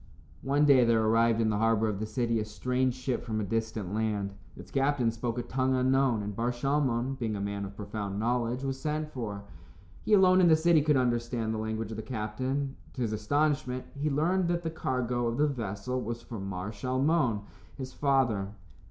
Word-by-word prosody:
One 140 +2 +2
day 135 -3 +6
there 115 -1 +3
arrived 115 +1 +3
in 110 -1 +2
the 105 - 0
harbor 110 0 +3
of 105 -2 -2
the 110 - -3
city 115 -1 0
a 105 - -2
strange 125 +3 -1
ship 130 -1 -2
from 110 -2 -2
a - - -1
distant 110 -2 -2
land. 105 -2 -1 0.2
Its - - -11
captain 135 -4 +2
spoke 115 +1 -3
a 120 - -1
tongue 130 +1 0
unknown, 130 -3 +2
and 100 0 -5
Bar 120 +3 0
Shalmon, 135 0 0
being 110 -3 -1
a - - -3
man 100 0 -3
of 100 0 -9
profound 100 -1 -4
knowledge, 120 +2 0
was 135 -1 -2
sent 150 +1 -2
for. 105 -5 -5 0.6
He 215 - 0
alone 185 -1 +6
in 175 - +6
the 160 - +7
city 160 0 +4
could 150 -1 +3
understand 120 -2 0
the 110 - -2
language 110 0 -3
of 110 - -5
the - - -3
captain. 130 +5 -3 0.2
To 125 - -2
his 110 -2 -1
astonishment, 140 +3 0
he 145 +2 -1
learned 170 +6 +1
that 175 0 0
the 165 - -2
cargo 125 -5 -1
of 115 - -2
the 150 - +4
vessel 120 -2 -3
was 115 0 -5
for 115 -3 -7
Mar 95 +1 -4
Shalmon, 130 +1 +1 0.4
his 130 -2 -6
father. 130 -8 +1
120 Hz, 205 wpm, -29 LUFS, 110-135 Hz, 0.6 s, the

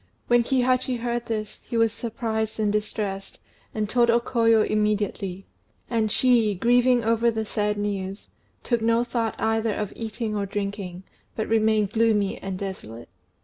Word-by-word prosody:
When 240 0 +4
Kihachi 255 0 +1
heard 240 0 -2
this 215 -2 -4
he 235 - -3
was 225 -1 +3
surprised 220 -1 -3
and 210 -1 +2
distressed, 210 -2 -3 0.3
and 215 -1 -2
told 240 +2 +3
O 235 +1 +5
Koyo 230 -2 +3
immediately; 205 -3 -1 0.5
and 220 -2 +1
she, 235 -5 +3
grieving 245 +4 +3
over 230 +1 +3
the 220 -1 -2
sad 210 0 -1
news, 200 -1 -4 0.3
took 235 -2 0
no 230 +1 +3
thought 235 -2 -2
either 225 -1 0
of 210 -2 -3
eating 225 -1 -4
or 200 -1 -1
drinking, 200 -2 -4 0.3
but 220 - -2
remained 215 -2 +2
gloomy 220 -3 +2
and 190 -1 -5
desolate. 120 - -7
220 Hz, 150 wpm, -25 LUFS, 205-235 Hz, 0.5 s, O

